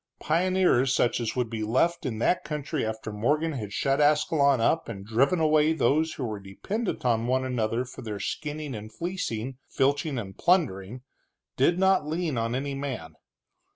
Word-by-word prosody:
Pioneers, 170 Hz, -6 st, +2 dB
such 120 Hz, -, +2 dB
as 115 Hz, -2 st, -2 dB
would 125 Hz, -2 st, 0 dB
be 110 Hz, -1 st, -5 dB
left 135 Hz, +9 st, +1 dB
in 115 Hz, -4 st, -3 dB
that 150 Hz, +10 st, +1 dB
country 150 Hz, -1 st, -3 dB
after 110 Hz, 0 st, -4 dB
Morgan 150 Hz, +10 st, +1 dB
had 110 Hz, -9 st, -5 dB
shut 135 Hz, +6 st, +1 dB
Ascalon 145 Hz, -2 st, +3 dB
up 160 Hz, +7 st, +1 dB
and 100 Hz, -4 st, -7 dB
driven 135 Hz, -, +2 dB
away 155 Hz, 0 st, +4 dB
those 155 Hz, +2 st, +2 dB
who 130 Hz, -, -4 dB
were 110 Hz, -3 st, -4 dB
dependent 185 Hz, -, -4 dB
on 115 Hz, -1 st, +2 dB
one 130 Hz, +1 st, +1 dB
another 120 Hz, -1 st, -1 dB
for 125 Hz, -, -10 dB
their 105 Hz, -3 st, -5 dB
skinning 150 Hz, +1 st, -4 dB
and 110 Hz, 0 st, -7 dB
fleecing, 135 Hz, -, -4 dB
filching 140 Hz, +1 st, +1 dB
and 95 Hz, -5 st, -5 dB
plundering, 125 Hz, -, +1 dB, 0.5 s
did 155 Hz, +7 st, +3 dB
not 190 Hz, -4 st, +3 dB
lean 160 Hz, -2 st, -1 dB
on 115 Hz, +1 st, -1 dB
any 140 Hz, +2 st, -2 dB
man. 130 Hz, -, -5 dB
135 Hz, 170 wpm, -27 LUFS, 115-155 Hz, 0.5 s, away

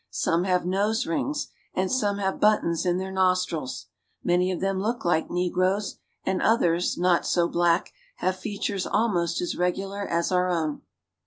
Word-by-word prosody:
Some 170 Hz, +2 st, 0 dB
have 180 Hz, -2 st, +1 dB
nose 205 Hz, +6 st, +1 dB
rings, 290 Hz, -, -2 dB, 0.3 s
and 185 Hz, 0 st, 0 dB
some 205 Hz, -6 st, +1 dB
have 190 Hz, -1 st, -1 dB
buttons 190 Hz, -5 st, +2 dB
in 175 Hz, 0 st, +2 dB
their 190 Hz, +1 st, -4 dB
nostrils. 185 Hz, -7 st, 0 dB, 0.4 s
Many 180 Hz, +1 st, +2 dB
of 180 Hz, -, -3 dB
them 195 Hz, 0 st, 0 dB
look 225 Hz, +1 st, -2 dB
like 165 Hz, -2 st, +1 dB
negroes, 185 Hz, +3 st, 0 dB, 0.3 s
and 185 Hz, -, 0 dB
others, 175 Hz, -6 st, +2 dB
not 175 Hz, -1 st, +3 dB
so 170 Hz, -1 st, +2 dB
black, 170 Hz, 0 st, +1 dB, 0.2 s
have 185 Hz, -, -1 dB
features 195 Hz, 0 st, -3 dB
almost 175 Hz, -7 st, +1 dB
as 175 Hz, -, -2 dB
regular 195 Hz, +3 st, -1 dB
as 170 Hz, +2 st, 0 dB
our 180 Hz, 0 st, +2 dB
own. 160 Hz, -4 st, -1 dB
185 Hz, 160 wpm, -26 LUFS, 175-195 Hz, 0.4 s, not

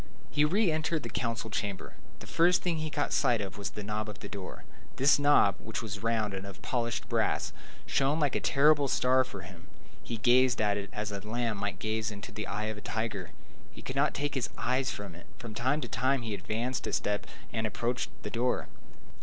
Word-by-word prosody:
He 150 Hz, -, +3 dB
re 185 Hz, +4 st, +3 dB
entered 155 Hz, 0 st, 0 dB
the 120 Hz, -, -4 dB
council 115 Hz, -2 st, -2 dB
chamber. 100 Hz, -2 st, -3 dB, 0.3 s
The -, -, -8 dB
first 175 Hz, +1 st, +3 dB
thing 175 Hz, -3 st, +1 dB
he 155 Hz, 0 st, -2 dB
caught 145 Hz, -1 st, -1 dB
sight 125 Hz, -5 st, +3 dB
of 100 Hz, -1 st, -4 dB
was 100 Hz, -1 st, -3 dB
the 105 Hz, +3 st, -7 dB
knob 105 Hz, +1 st, -2 dB
of 105 Hz, -, -7 dB
the -, -, -8 dB
door. 100 Hz, -2 st, -7 dB, 0.3 s
This 140 Hz, +3 st, +5 dB
knob, 145 Hz, -9 st, +5 dB
which 110 Hz, +2 st, -5 dB
was 105 Hz, -2 st, -5 dB
round 110 Hz, -3 st, +1 dB
and 95 Hz, 0 st, -4 dB
of 100 Hz, -1 st, -9 dB
polished 120 Hz, -2 st, -1 dB
brass, -, -, +1 dB, 0.3 s
shone 140 Hz, +3 st, +2 dB
like 145 Hz, -4 st, +2 dB
a -, -, +2 dB
terrible 145 Hz, 0 st, +4 dB
star 130 Hz, 0 st, +4 dB
for 100 Hz, -7 st, -8 dB
him. 90 Hz, -1 st, -12 dB, 0.3 s
He 115 Hz, -, -4 dB
gazed 125 Hz, +2 st, +5 dB
at 105 Hz, -1 st, +3 dB
it 100 Hz, -1 st, -4 dB
as 105 Hz, 0 st, -3 dB
a 100 Hz, -, -3 dB
lamb 115 Hz, +1 st, -1 dB
might 100 Hz, 0 st, -2 dB
gaze 110 Hz, +1 st, -1 dB
into 105 Hz, +2 st, -8 dB
the 105 Hz, 0 st, -5 dB
eye 105 Hz, +2 st, -2 dB
of 110 Hz, -1 st, -3 dB
a -, -, -14 dB
tiger. 105 Hz, -6 st, -3 dB, 0.4 s
He -, -, -13 dB
could 130 Hz, -, -5 dB
not 140 Hz, +1 st, +2 dB
take 145 Hz, 0 st, -1 dB
his 130 Hz, -3 st, -1 dB
eyes 130 Hz, +1 st, +1 dB
from 100 Hz, -3 st, -5 dB
it. 85 Hz, +1 st, -13 dB
From 115 Hz, -4 st, -7 dB
time 130 Hz, +7 st, +1 dB
to 120 Hz, -, -3 dB
time 130 Hz, +3 st, +1 dB
he 110 Hz, -2 st, -3 dB
advanced 110 Hz, +6 st, -2 dB
a -, -, -3 dB
step 105 Hz, 0 st, 0 dB, 0.3 s
and 110 Hz, 0 st, 0 dB
approached 120 Hz, +4 st, -1 dB
the 105 Hz, -, -4 dB
door. 125 Hz, +2 st, 0 dB
115 Hz, 220 wpm, -30 LUFS, 105-130 Hz, 0.4 s, This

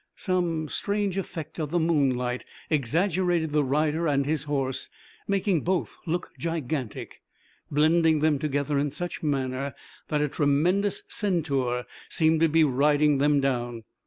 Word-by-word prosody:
Some 175 Hz, -4 st, -1 dB
strange 200 Hz, +2 st, -1 dB
effect 170 Hz, -5 st, -5 dB
of 155 Hz, -2 st, -2 dB
the 175 Hz, -, 0 dB
moonlight 130 Hz, -7 st, +1 dB, 0.3 s
exaggerated 165 Hz, -, +1 dB
the 150 Hz, 0 st, +2 dB
rider 155 Hz, +4 st, +1 dB
and 140 Hz, -2 st, +2 dB
his 150 Hz, 0 st, -1 dB
horse, 135 Hz, -3 st, -2 dB, 0.4 s
making 195 Hz, -4 st, +1 dB
both 180 Hz, +2 st, -1 dB
look 175 Hz, +2 st, -2 dB
gigantic, 155 Hz, -7 st, -4 dB, 0.5 s
blending 160 Hz, +2 st, +4 dB
them 150 Hz, -2 st, +2 dB
together 145 Hz, 0 st, 0 dB
in 145 Hz, +1 st, 0 dB
such 175 Hz, +5 st, -5 dB
manner 135 Hz, -2 st, -2 dB, 0.3 s
that 150 Hz, -, 0 dB
a 150 Hz, -, +2 dB
tremendous 165 Hz, +9 st, +1 dB
centaur 140 Hz, -, -1 dB, 0.2 s
seemed 160 Hz, 0 st, +2 dB
to 165 Hz, 0 st, +4 dB
be 160 Hz, +1 st, +4 dB
riding 145 Hz, +1 st, +3 dB
them 145 Hz, 0 st, +3 dB
down. 120 Hz, -4 st, -1 dB
150 Hz, 135 wpm, -26 LUFS, 140-170 Hz, 0.5 s, blending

